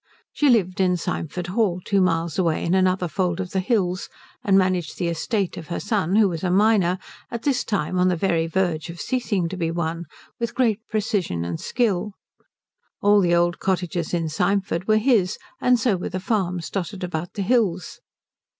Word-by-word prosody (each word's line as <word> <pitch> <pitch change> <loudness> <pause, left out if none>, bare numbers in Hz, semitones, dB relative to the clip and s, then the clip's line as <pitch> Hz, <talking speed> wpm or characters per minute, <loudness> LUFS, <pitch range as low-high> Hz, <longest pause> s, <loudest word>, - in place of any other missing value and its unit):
She 295 - +3
lived 195 -6 +2
at 180 -1 +3
Symford 175 +1 -3
Hall, 185 -1 0
two 200 -1 +2
miles 165 -2 0
away 165 -4 +1
in 170 - +1
another 185 -1 +2
fold 180 0 -1
of 185 -1 -4
the 190 - 0
hills, 185 -3 0 0.3
and 195 -1 +4
managed 185 -4 +1
the 175 - -1
estate 190 +4 -2
of 160 - -8
her 170 - -3
son 205 -4 0
who 215 -1 +5
was 170 -2 -4
a 180 - +1
minor 190 -2 +3 0.3
at 235 -1 -5
this 265 -4 +1
time 195 -3 -1
on 180 - +4
the 180 - +2
very 165 -2 +1
verge 170 -2 -1
of 170 0 -8
ceasing 220 -9 -1
to 185 - -5
be 165 -2 -1
one 165 0 -2 0.3
with 235 -1 -3
great 230 -5 +2
precision 200 - -1
and 85 -1 -4
skill. 210 -4 0 0.9
All 205 0 +5
the 175 -2 +3
old 175 0 +1
cottages 180 -3 -1
in 170 -2 0
Symford 185 +2 0
were 215 0 +4
his, 215 -5 +2 0.2
and 250 -1 +4
so 220 -4 +2
were 175 - -4
the 185 - -3
farms 180 -5 -1
dotted 195 0 -4
about 175 -1 -4
the 200 - -1
hills. 195 -5 0
185 Hz, 190 wpm, -23 LUFS, 170-205 Hz, 0.9 s, who